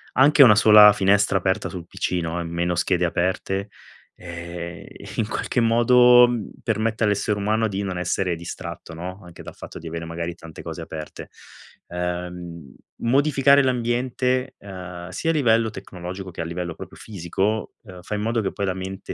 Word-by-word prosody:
Anche 140 +2 +7
1 110 -4 +8
sola 105 -1 +8
finestra 100 0 +3
aperta 95 +3 -1
sul 85 -3 -8
PC, 90 - -2
no, 80 +1 -3
e 85 - -3
meno 85 +1 -2
schede 90 +1 +1
aperte. 95 +3 -1 0.5
Ehm, 85 0 -8 0.3
in 110 - -1
qualche 120 +2 -1
modo 120 +1 +6 0.3
permette 110 0 -1
all'essere 105 0 0
umano 110 +2 +1
di 100 -1 -3
non 95 -2 -3
essere 90 0 -1
distratto, 85 0 -8
no? 90 +4 -7
Anche 85 -1 -12
dal - - -10
fatto - - -10
di 85 - -9
avere 85 0 -5
magari 85 +1 -5
tante 80 -2 -11
cose - - -7
aperte. 80 -1 -8 0.6
Uhm, 90 -4 -6 0.2
modificare 140 +2 +3
l'ambiente, 125 +1 0
ehm, 90 -2 -9
sia 160 - -3
a - - -1
livello 115 -6 +3
tecnologico 95 0 -8
che 85 - -6
a - - -3
livello 85 0 -5
proprio - - -10
fisico, 100 +2 -3
uhm, 95 -5 -12
fa - - -6
in 105 - -3
modo 115 +1 0
che 95 - -2
poi 100 - -3
la 95 - 0
mente 95 +1 -6
95 Hz, 170 wpm, -23 LUFS, 85-115 Hz, 0.6 s, 1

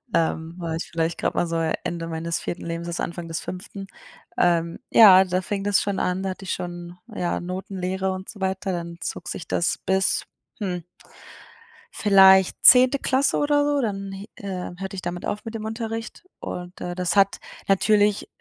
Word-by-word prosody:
Ähm, 160 0 0
da - - -7
war 160 - -2
ich 165 - -4
vielleicht 165 0 -1
gerade - - -1
mal 175 - +1
so 165 - -3 0.3
Ende 170 -1 -3
meines 165 0 -3
4. 175 - -5
Lebensjahres, 170 +1 -4
Anfang 170 0 -4
des 165 0 -3
5. 195 +1 -7 0.5
Ähm 170 -1 +2
ja, 190 -4 +9
da 185 0 -1
fing 195 +1 -3
das 205 -1 +2
schon 200 -1 -2
an, 180 +1 -1
da 195 - -2
hatte 190 +1 -7
ich 185 - -2
schon, 175 0 -6 0.2
ja, 175 - -1
Notenlehre 190 +1 -3
und 185 0 -6
so 210 - -10
weiter, 190 0 -2
dann 170 -1 -5
zog - - -5
sich 165 - -6
das 175 - 0
bis, 190 0 +1 0.3
hm 180 -5 -3 1.1
vielleicht 190 -2 +6
10. 255 +2 +8
Klasse 270 0 +1
oder 290 0 +2
so, 290 -1 +1
dann, 195 -5 -3
hi 195 +1 -8
äh, 190 -3 -5
hörte 195 0 -5
ich 185 - -6
damit 175 0 -4
auf 210 0 -4
mit 225 - -6
dem 225 -1 -5
Unterricht 225 +3 -5 0.2
und, 180 +1 -7
äh, 175 0 -4
das 180 0 -1
hat 200 0 +4 0.3
natürlich 205 +1 +3
190 Hz, 185 wpm, -24 LUFS, 175-200 Hz, 1.1 s, ja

